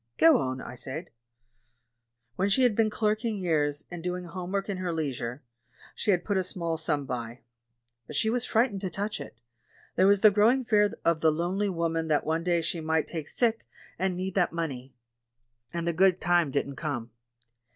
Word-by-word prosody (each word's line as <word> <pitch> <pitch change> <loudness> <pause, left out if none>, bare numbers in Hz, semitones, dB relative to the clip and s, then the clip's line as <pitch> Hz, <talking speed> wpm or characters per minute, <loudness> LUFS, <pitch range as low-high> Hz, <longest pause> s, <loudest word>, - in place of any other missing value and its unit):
" - - -52
"Go 320 -6 +6
on," 130 0 -2
I - - -8
said. 140 +7 -6 1.2
"When 195 +2 +1
she 255 +6 +3
had 245 -4 +4
been 220 0 +3
clerking 215 +1 0
years, 150 -5 0
and 175 -1 -6
doing 180 +1 -3
home 180 +1 -6
work 195 0 -1
in 200 -2 -3
her 185 -1 -2
leisure, 140 -5 -3 0.5
she - - -3
had 180 -3 +3
put 205 -2 0
a 190 - +2
small 170 -2 -3
sum 155 -3 -1
by. 120 -1 -5 0.7
But - - -8
she - - +2
was 240 +2 +1
frightened 225 -5 +1
to 190 - -2
touch 205 +4 -3
it - - -10 0.3
— - - -30
there 185 - +5
was 200 -1 +4
the 215 - +8
growing 230 +6 +3
fear 210 -2 +3
of 165 -1 +2
the 160 - +5
lonely 180 +6 0
woman 165 -2 -1
that 150 -2 +1
one 160 +2 0
day 170 -1 +1
she 165 +1 -2
might 160 0 +1
take 160 -3 -5
sick 230 -2 0 0.3
and 185 -1 0
need 185 +1 -3
that 180 -3 +2
money. 135 -6 -4 0.8
And 170 0 -3
the 170 - +1
'good 185 +1 +4
time' 175 -2 +3
didn't 140 0 -2
come. 125 -7 -4
175 Hz, 200 wpm, -28 LUFS, 155-200 Hz, 1.2 s, the